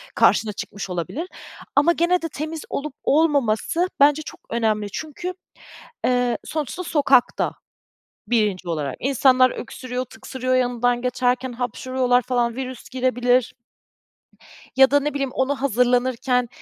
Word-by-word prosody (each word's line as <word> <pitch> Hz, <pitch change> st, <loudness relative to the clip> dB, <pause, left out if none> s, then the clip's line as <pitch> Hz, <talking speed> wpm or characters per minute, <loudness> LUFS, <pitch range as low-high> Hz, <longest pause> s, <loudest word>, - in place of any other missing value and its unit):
karşına 215 Hz, -2 st, +3 dB
çıkmış 200 Hz, -1 st, -6 dB
olabilir. 180 Hz, -, -4 dB, 0.5 s
Ama 295 Hz, +4 st, +5 dB
gene 345 Hz, +1 st, +2 dB
de 330 Hz, -, -3 dB
temiz 310 Hz, +2 st, -5 dB
olup 295 Hz, -1 st, -4 dB
olmaması 295 Hz, -, +2 dB
bence 290 Hz, +2 st, +5 dB
çok -, -, -10 dB
önemli. 220 Hz, -3 st, 0 dB
Çünkü, 315 Hz, -, -5 dB, 0.7 s
eee, 245 Hz, -1 st, +1 dB
sonuçta 305 Hz, +3 st, -4 dB
sokakta, 275 Hz, -6 st, +2 dB, 0.8 s
1'inci 210 Hz, -6 st, +1 dB
olarak. 150 Hz, -5 st, -2 dB
İnsanlar 255 Hz, -1 st, +4 dB
öksürüyor, 255 Hz, 0 st, -5 dB
tıksırıyor 255 Hz, +2 st, -4 dB
yanından 245 Hz, -1 st, +1 dB
geçerken 250 Hz, 0 st, 0 dB
hapşırıyorlar 250 Hz, 0 st, 0 dB
falan, 240 Hz, -2 st, 0 dB
virüs 260 Hz, -2 st, -6 dB
girebilir. 250 Hz, -1 st, +1 dB, 1.2 s
Ya 265 Hz, 0 st, +7 dB
da 285 Hz, +1 st, +4 dB
ne 295 Hz, +1 st, -2 dB
bileyim, 275 Hz, -2 st, -1 dB
ona 265 Hz, +1 st, -1 dB
hazırlanırken 250 Hz, 0 st, +1 dB
255 Hz, 120 wpm, -22 LUFS, 240-280 Hz, 1.2 s, Ya